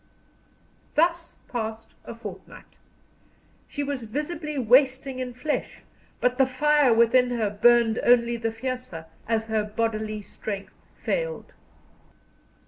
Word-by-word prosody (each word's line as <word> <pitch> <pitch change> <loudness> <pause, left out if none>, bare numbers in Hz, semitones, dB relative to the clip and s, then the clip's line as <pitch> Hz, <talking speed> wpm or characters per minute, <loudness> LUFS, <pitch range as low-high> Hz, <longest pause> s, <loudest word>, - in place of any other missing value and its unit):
Thus 335 +1 +1
passed 225 -2 -5
a - - -7
fortnight. - - -11 0.9
She 285 - -4
was 275 -4 -3
visibly 300 +5 -4
wasting 260 +2 +3
in 250 -1 -4
flesh, 295 +4 -3 0.4
but 250 +1 +1
the 265 - +5
fire 290 +1 +3
within 235 +2 +4
her 225 -4 0
burned 235 +1 +4
only 235 -1 +4
the 225 -1 -1
fiercer 225 -8 -5 0.2
as 225 -1 0
her 220 -1 0
bodily 215 0 -2
strength 200 -1 -6 0.2
failed. - - -3
245 Hz, 115 wpm, -25 LUFS, 225-275 Hz, 0.9 s, the